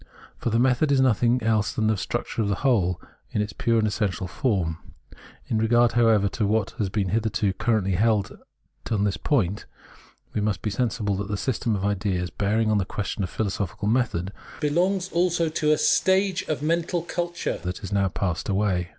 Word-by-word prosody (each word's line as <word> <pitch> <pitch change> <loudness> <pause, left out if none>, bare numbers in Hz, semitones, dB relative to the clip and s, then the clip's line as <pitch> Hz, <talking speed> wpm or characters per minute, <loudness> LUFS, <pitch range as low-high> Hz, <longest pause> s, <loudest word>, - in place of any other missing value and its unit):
For - - -1
the 115 - +1
method 130 +4 +3
is 140 - +4
nothing 125 -1 +3
else 110 -1 +1
than 110 - 0
the 110 0 +3
structure 105 - -3
of 105 - 0
the 100 - +1
whole 95 -9 +2 0.3
in - - -2
its 105 -1 -2
pure 115 +2 +1
and 110 -1 +2
essential 100 -3 -1
form. 95 - -1 0.7
In 110 - -1
regard, 120 +2 +4
however, 115 -4 +4
to 105 0 -1
what 110 0 +1
has 100 -3 0
been 100 -1 -1
hitherto 105 -1 0
currently 110 -3 0
held 105 +1 +1 0.5
on 105 -3 +1
this 100 -1 0
point, 105 - 0 0.7
we 105 - -1
must 105 -3 -1
be 105 - -1
sensible 110 -2 -1
that 100 0 -3
the 105 0 -2
system 115 -1 -1
of 100 -1 -2
ideas 95 -3 -1
bearing 110 +2 +1
on 105 - +3
the - - +1
question 105 +2 -4
of 90 - -2
philosophical 100 -1 -3
method, 105 -6 0 0.3
belongs 180 +5 +1
also 170 -1 +1
to 155 -1 +1
a 155 - +4
stage 190 -1 +2
of 150 -2 -2
mental 170 +2 0
culture 175 0 -3
that 90 +1 -4
has 100 - -8
now 100 -1 +2
passed 90 0 -2
away. 95 -3 0
110 Hz, 190 wpm, -25 LUFS, 100-125 Hz, 0.7 s, is